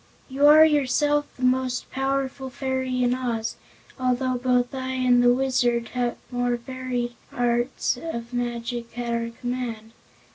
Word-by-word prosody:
You 275 Hz, +2 st, +4 dB
are 310 Hz, +1 st, +9 dB
yourself 295 Hz, 0 st, +2 dB
the 255 Hz, -, -7 dB
most 255 Hz, 0 st, 0 dB
powerful 270 Hz, 0 st, -2 dB
fairy 260 Hz, -1 st, -1 dB
in 245 Hz, 0 st, +3 dB
Oz, 235 Hz, -3 st, -2 dB, 0.4 s
although 255 Hz, 0 st, +1 dB
both 245 Hz, 0 st, +1 dB
I 260 Hz, -1 st, -3 dB
and 250 Hz, -1 st, +3 dB
the 245 Hz, 0 st, +6 dB
Wizard 245 Hz, -2 st, +1 dB
have 245 Hz, -1 st, -1 dB
more 245 Hz, 0 st, 0 dB
varied 245 Hz, -1 st, -4 dB, 0.2 s
arts 240 Hz, +1 st, 0 dB
of 235 Hz, -7 st, -5 dB
magic 240 Hz, -1 st, -3 dB
at 240 Hz, -1 st, -2 dB
our 230 Hz, 0 st, -1 dB
command. 230 Hz, -2 st, -5 dB
250 Hz, 140 wpm, -25 LUFS, 240-260 Hz, 0.4 s, are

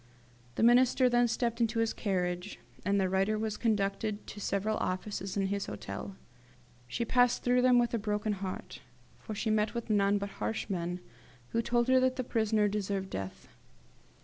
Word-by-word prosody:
The -, -, 0 dB
Minister 250 Hz, +2 st, +5 dB
then 240 Hz, 0 st, +4 dB
stepped 235 Hz, 0 st, -1 dB
into 230 Hz, 0 st, +1 dB
his 225 Hz, 0 st, +1 dB
carriage, 180 Hz, -1 st, -2 dB, 0.3 s
and 200 Hz, +1 st, +2 dB
the 190 Hz, -, +2 dB
writer 195 Hz, +3 st, +1 dB
was 215 Hz, -1 st, -2 dB
conducted 210 Hz, -1 st, -1 dB
to 210 Hz, -, -9 dB
several 200 Hz, +2 st, 0 dB
offices 195 Hz, +1 st, -3 dB
in 195 Hz, -, +1 dB
his 200 Hz, +1 st, -2 dB
hotel. 100 Hz, -1 st, -6 dB, 0.7 s
She 230 Hz, -, -2 dB
passed 245 Hz, 0 st, +3 dB
through 250 Hz, 0 st, +3 dB
them 250 Hz, 0 st, +5 dB
with 240 Hz, 0 st, +2 dB
a 230 Hz, -, +1 dB
broken 210 Hz, 0 st, -1 dB
heart, 190 Hz, -1 st, -6 dB, 0.4 s
for 215 Hz, -, -7 dB
she 220 Hz, +1 st, -1 dB
met 215 Hz, +2 st, +1 dB
with 235 Hz, -1 st, -3 dB
none 200 Hz, -1 st, +3 dB
but 200 Hz, 0 st, -3 dB
harsh 225 Hz, -, -2 dB
men, 180 Hz, 0 st, -2 dB, 0.5 s
who 230 Hz, -, +1 dB
told 240 Hz, +1 st, +1 dB
her 260 Hz, 0 st, +5 dB
that 255 Hz, 0 st, +2 dB
the 255 Hz, -, -2 dB
prisoner 220 Hz, -3 st, +1 dB
deserved 200 Hz, -2 st, -2 dB
death. 95 Hz, 0 st, -6 dB
210 Hz, 175 wpm, -31 LUFS, 195-235 Hz, 0.7 s, Minister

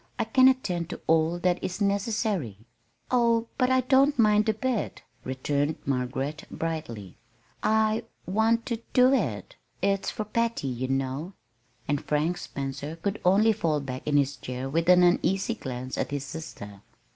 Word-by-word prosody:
I 235 Hz, -, +1 dB
can 255 Hz, +4 st, +5 dB
attend 185 Hz, -11 st, +1 dB
to -, -, -7 dB
all 160 Hz, +1 st, +2 dB
that 180 Hz, 0 st, 0 dB
is 185 Hz, +2 st, -3 dB
necessary." 200 Hz, -, -1 dB, 0.5 s
"Oh, 235 Hz, -2 st, +3 dB
but 255 Hz, -1 st, +3 dB
I 260 Hz, 0 st, +4 dB
don't 270 Hz, +3 st, +3 dB
mind 215 Hz, -1 st, +4 dB
a -, -, +3 dB
bit," 240 Hz, 0 st, -2 dB, 0.2 s
returned 145 Hz, +3 st, -1 dB
Margaret, 135 Hz, +3 st, -2 dB
brightly. 120 Hz, -, -5 dB, 0.4 s
"I 220 Hz, +1 st, +2 dB, 0.2 s
want 225 Hz, +4 st, +1 dB
to 235 Hz, -2 st, -3 dB
do 255 Hz, +1 st, +6 dB
it. 125 Hz, -, -2 dB, 0.2 s
It's 195 Hz, +1 st, 0 dB
for 215 Hz, -, -4 dB
Patty, 230 Hz, -9 st, -1 dB
you 125 Hz, +1 st, -3 dB
know." 135 Hz, +6 st, -2 dB, 0.5 s
And 145 Hz, 0 st, -1 dB
Frank 155 Hz, +4 st, 0 dB
Spencer 140 Hz, +3 st, -5 dB
could 195 Hz, +5 st, -3 dB
only 205 Hz, +5 st, +5 dB
fall 165 Hz, -8 st, 0 dB
back 130 Hz, -1 st, -6 dB
in 145 Hz, -1 st, +3 dB
his 140 Hz, -1 st, +1 dB
chair 125 Hz, +1 st, -5 dB
with 165 Hz, +5 st, 0 dB
an 180 Hz, 0 st, +7 dB
uneasy 190 Hz, +4 st, +2 dB
glance 130 Hz, -, -6 dB
at -, -, -1 dB
his 140 Hz, 0 st, -3 dB
sister. 105 Hz, -11 st, -8 dB
175 Hz, 155 wpm, -27 LUFS, 140-220 Hz, 0.5 s, an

